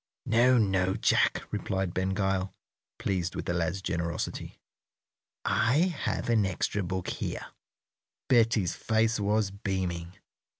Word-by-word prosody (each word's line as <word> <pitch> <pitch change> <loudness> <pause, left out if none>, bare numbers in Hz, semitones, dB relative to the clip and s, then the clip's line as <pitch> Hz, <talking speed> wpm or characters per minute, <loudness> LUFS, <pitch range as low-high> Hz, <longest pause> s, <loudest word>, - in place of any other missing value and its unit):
"No, 125 +3 +4
no, 95 -3 +2
Jack," 110 - +2
replied 95 -2 -2
Ben 95 +1 0
Gile, 95 -1 -1 0.4
pleased 90 -3 -2
with - - -4
the 85 - -1
lad's 90 +2 -1
generosity. 85 -2 -3 0.9
"I 160 +9 +2
have - - -1
an 115 -3 +3
extra 95 +2 -1
book 95 0 -3
here." - - -4 0.8
Betty's 115 -7 +3
face 110 0 +1
was 105 0 +1
beaming. 95 -3 -3
95 Hz, 120 wpm, -29 LUFS, 90-110 Hz, 0.9 s, No